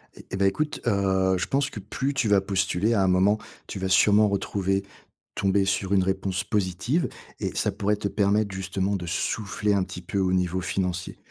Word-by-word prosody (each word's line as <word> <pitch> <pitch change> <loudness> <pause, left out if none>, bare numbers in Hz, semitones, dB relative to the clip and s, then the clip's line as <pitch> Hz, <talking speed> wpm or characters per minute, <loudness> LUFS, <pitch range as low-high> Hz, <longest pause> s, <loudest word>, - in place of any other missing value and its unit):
Eh - - -13
eh 95 - -2
bah, 100 0 +3
écoute, 150 +10 -1
heu, 95 -2 +2
je - - -1
pense 140 +1 +1
que - - -8
plus 130 +7 -3
tu 135 -4 0
vas 100 -2 +4
postuler, 95 +2 0
à 100 -4 +3
un 95 - +2
moment, 95 +3 +4 0.3
tu 100 - -6
vas 95 0 -2
sûrement 105 +3 +5
retrouver 100 -1 -1 0.5
tomber 95 0 +2
sur 95 0 0
une 95 -2 +4
réponse 95 0 -1
positive 105 - 0 0.3
et - - -3
ça 105 - +1
pourrait 105 +1 0
te 100 0 -3
permettre 100 0 +1
justement 95 +1 -2
de 90 - -6
souffler 105 +4 -1
un 95 -2 +2
petit 90 - -7
peu 90 +3 -4
au 95 -1 +1
niveau 90 0 +1
financier. 90 -1 -3
95 Hz, 200 wpm, -25 LUFS, 95-105 Hz, 0.5 s, sûrement